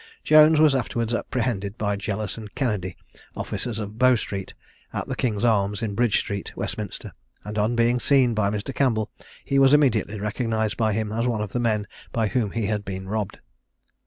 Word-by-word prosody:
Jones 155 0 +7
was 155 -2 +6
afterwards 120 -3 -1
apprehended 115 -4 -2
by 105 -2 0
Jealous 100 0 -3
and 110 -3 -10
Kennedy, 100 -9 -2 0.4
officers 120 -3 -3
of 105 0 -6
Bow 130 0 +6
street, 100 -4 -5 0.4
at - - -4
the - - -3
King's 110 -4 -1
Arms, 105 -2 +2
in 105 -3 -2
Bridge 120 0 +2
street, 100 -2 -4
Westminster, - - -5 0.3
and 105 0 -5
on 110 +3 +1
being 120 +1 +3
seen 130 -3 +3
by 105 -2 +1
Mr. 105 +6 -3
Campbell, 115 -5 +1 0.3
he 140 - +2
was 135 +1 +7
immediately 110 -7 +2
recognised 110 +1 -1
by 110 -2 +1
him 110 0 -2
as 115 +3 0
one 115 -3 0
of 105 - -6
the 120 - -1
men 110 -3 +1 0.3
by 110 -3 0
whom 115 -3 0
he 115 +1 -2
had 105 0 -1
been 95 -1 -6
robbed. 105 0 -3
110 Hz, 190 wpm, -24 LUFS, 105-120 Hz, 0.4 s, Jones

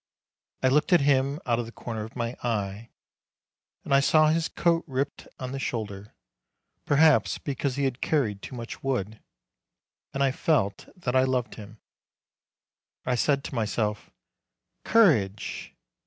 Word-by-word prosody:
I - - +5
looked 150 +7 +2
at 175 - +6
him 140 +1 +2
out 120 -2 +1
of 120 - -3
the - - -9
corner 115 -2 -5
of 110 - -10
my 120 0 -3
eye, 105 -1 -3 0.9
and - - -2
I 140 - +7
saw 155 +2 +4
his 160 +1 +1
coat 170 -1 +1
ripped 135 +1 -3
on 130 -1 -5
the 135 - -4
shoulder, 105 -5 -5 0.7
perhaps 155 +1 +4
because 140 -2 -3
he 140 - -1
had 135 -2 -1
carried 110 -10 0
too 130 - -8
much 115 -1 -7
wood, 110 -6 -2 0.9
and 140 - 0
I 135 - +3
felt 130 -8 0
that 135 -9 -3
I 130 - +6
loved 130 -2 0
him. 105 0 -11 1.3
I 125 - +1
said 140 +3 +1
to - - -7
myself, 105 -2 -2 0.7
"Courage!" 120 - +2
130 Hz, 150 wpm, -27 LUFS, 110-140 Hz, 1.3 s, I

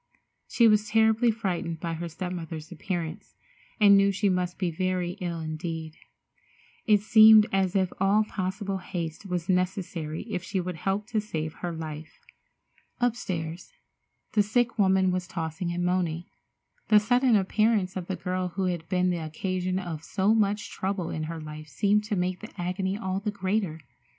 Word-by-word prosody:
She 235 - +4
was 210 -1 +3
terribly 220 +2 +4
frightened 180 -7 -2
by 170 -1 -3
her 170 +1 -4
step 180 +2 -5
mother's 165 -2 -6
appearance, 170 -2 -5 0.4
and 200 -2 +7
knew 200 0 +5
she 200 +1 +1
must 180 -1 -1
be 180 -3 -1
very 185 +1 -1
ill 170 -2 -3
indeed. 160 0 -5 0.9
It 210 -2 +5
seemed 215 0 +8
as 190 0 +1
if 190 -2 +1
all 200 +3 +4
possible 195 -1 -3
haste 175 0 -5
was 180 -2 -2
necessary 180 -4 -1
if 210 -5 -4
she 190 +2 -3
would 180 -1 -4
help 195 +5 -1
to 220 -3 0
save 160 -7 -4
her 175 - -3
life. 160 -1 -7 0.8
Upstairs, 185 -9 -2 0.6
the 215 - +4
sick 230 +3 0
woman 190 -1 +4
was 180 -1 -2
tossing 165 +1 -3
and 175 0 -1
moaning. 175 -2 0 0.6
The 210 - +7
sudden 245 +3 +3
appearance 205 -1 +2
of 180 -2 -4
the 190 - -2
girl 185 0 -2
who 195 - -1
had 175 -3 -2
been 180 -1 +2
the 175 - -1
occasion 185 +3 -2
of 170 -4 -5
so 200 +4 +1
much 210 -1 +1
trouble 190 -3 -2
in 155 0 -3
her 165 +1 -5
life 155 0 -8
seemed 205 +9 +2
to 210 - -1
make 180 0 -1
the 215 - -9
agony 190 +2 -1
all 190 -3 -2
the 210 +1 -2
greater. 190 -4 -1
185 Hz, 170 wpm, -27 LUFS, 170-205 Hz, 0.9 s, seemed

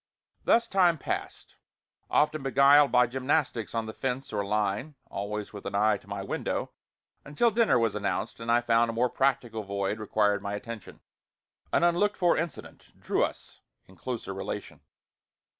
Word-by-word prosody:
Thus 235 0 +4
time 180 -5 +3
passed, - - -5 0.5
often 155 0 +2
beguiled 140 +2 +5
by 125 0 +5
gymnastics 130 - -1
on 115 -1 -1
the 110 - -6
fence 130 0 -4
or 100 -1 0
line 105 +7 -1 0.2
(always 105 +1 -4
with 100 - -8
an 100 - -4
eye 105 +1 +3
to - - -23
my 100 -1 -5
window) - - -3 0.5
until 150 +12 +1
dinner 225 - +3
was 115 -3 +1
announced 100 +1 -3
and 115 0 -2
I 120 +1 +4
found 115 0 +3
a - - -2
more 120 +2 +1
practical 120 -4 0
void 100 +1 -2
required 105 -1 +1
my 100 +1 -3
attention. 115 0 -8 0.7
An - - +2
unlooked 175 +4 +2
for 175 -2 +3
incident 165 -3 -6
drew - - 0
us - - -5 0.3
in 95 - -17
closer 115 0 -5
relation. 95 - -6
115 Hz, 160 wpm, -28 LUFS, 105-140 Hz, 0.7 s, beguiled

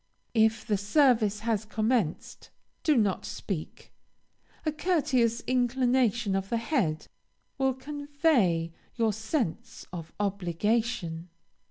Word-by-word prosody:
If 220 -1 +3
the 205 -2 0
service 215 -2 +3
has 225 -2 0
commenced, 215 -5 -1 0.3
do 305 -4 +3
not 205 -5 +1
speak; 180 -7 -6 0.7
a 310 - +2
courteous 270 -8 +1
inclination 245 -4 +2
of 195 0 -2
the 235 - +1
head 225 - 0 0.5
will 265 -1 +2
convey 280 - +1 0.2
your 225 -2 +2
sense 220 - -3
of 165 -2 -7
obligation. 200 -2 -1
225 Hz, 105 wpm, -28 LUFS, 195-255 Hz, 0.7 s, If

